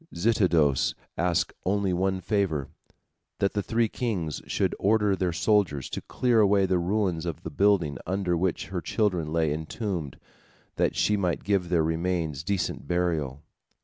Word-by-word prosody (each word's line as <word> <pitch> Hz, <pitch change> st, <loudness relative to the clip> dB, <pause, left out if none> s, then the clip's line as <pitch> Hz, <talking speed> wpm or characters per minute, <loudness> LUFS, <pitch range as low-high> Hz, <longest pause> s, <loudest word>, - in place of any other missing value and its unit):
Zitidos 85 Hz, -, +2 dB, 0.2 s
asked 85 Hz, +1 st, 0 dB
only 100 Hz, 0 st, +1 dB
one 95 Hz, +1 st, 0 dB
favor, 95 Hz, -, 0 dB, 0.7 s
that 100 Hz, -, 0 dB
the 105 Hz, -, 0 dB
three 115 Hz, +3 st, +1 dB
kings 100 Hz, -, -3 dB
should -, -, 0 dB
order 105 Hz, -1 st, +3 dB
their 90 Hz, -1 st, 0 dB
soldiers 85 Hz, -, +1 dB
to -, -, -3 dB
clear 120 Hz, -3 st, +1 dB
away 100 Hz, -2 st, +4 dB
the 95 Hz, -1 st, +1 dB
ruins 90 Hz, -2 st, 0 dB
of 85 Hz, -, -5 dB
the 80 Hz, -, -5 dB
building 90 Hz, -4 st, +2 dB
under 95 Hz, -1 st, 0 dB
which 90 Hz, 0 st, -1 dB
her 95 Hz, -2 st, -3 dB
children 90 Hz, -3 st, 0 dB
lay 80 Hz, -2 st, +1 dB
entombed, 80 Hz, -, -4 dB, 0.6 s
that -, -, +1 dB
she 105 Hz, -, +2 dB
might 90 Hz, -4 st, -1 dB
give 95 Hz, -3 st, 0 dB
their 85 Hz, -3 st, +3 dB
remains 80 Hz, -3 st, -1 dB
decent 90 Hz, -5 st, -2 dB
burial. 80 Hz, -6 st, -1 dB
90 Hz, 150 wpm, -27 LUFS, 80-100 Hz, 0.7 s, away